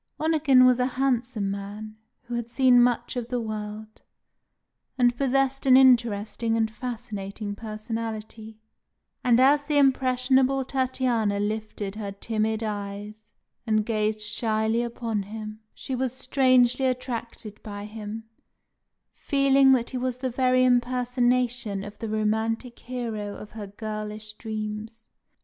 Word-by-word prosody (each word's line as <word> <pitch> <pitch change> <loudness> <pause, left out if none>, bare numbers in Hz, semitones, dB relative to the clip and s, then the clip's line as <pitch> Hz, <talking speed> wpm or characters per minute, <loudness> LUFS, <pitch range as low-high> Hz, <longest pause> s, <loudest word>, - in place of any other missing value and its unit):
Onegin 300 -5 +4
was 255 -1 +4
a 250 - +2
handsome 240 -6 0
man, 205 +2 -7 0.3
who 240 -1 -8
had 235 -1 -3
seen 250 -1 +5
much 245 +2 +1
of 245 -1 -4
the 250 -1 -1
world, 215 -1 -6 1.0
and 245 -1 +3
possessed 270 +1 0
an 260 -1 +8
interesting 230 -3 +3
and 220 -1 +1
fascinating 215 -3 -5
personality; 220 0 -6 0.7
and 245 -1 +4
as 285 +3 +5
the 295 0 0
impressionable 265 0 +3
Tatiana 250 -6 0
lifted 210 -1 -3
her 205 -2 -4
timid 220 +2 -2
eyes 210 +1 -6 0.4
and 215 -1 +2
gazed 215 -1 -1
shyly 220 +1 0
upon 230 -3 -3
him, 215 +1 -7
she 265 - -7
was 255 0 -1
strangely 255 -1 +3
attracted 235 -4 -5
by 205 -1 -7
him, 215 +1 -7 0.9
feeling 275 -1 +3
that 240 -2 0
he 255 - -3
was 250 -1 -2
the 255 0 -3
very 255 +1 +3
impersonation 245 -3 +1
of 205 0 -10
the 225 - -4
romantic 220 +3 -1
hero 225 -5 -5
of 210 - -10
her 210 -2 -7
girlish 215 +1 -6
dreams. 215 +1 -6
230 Hz, 125 wpm, -26 LUFS, 215-255 Hz, 1.0 s, an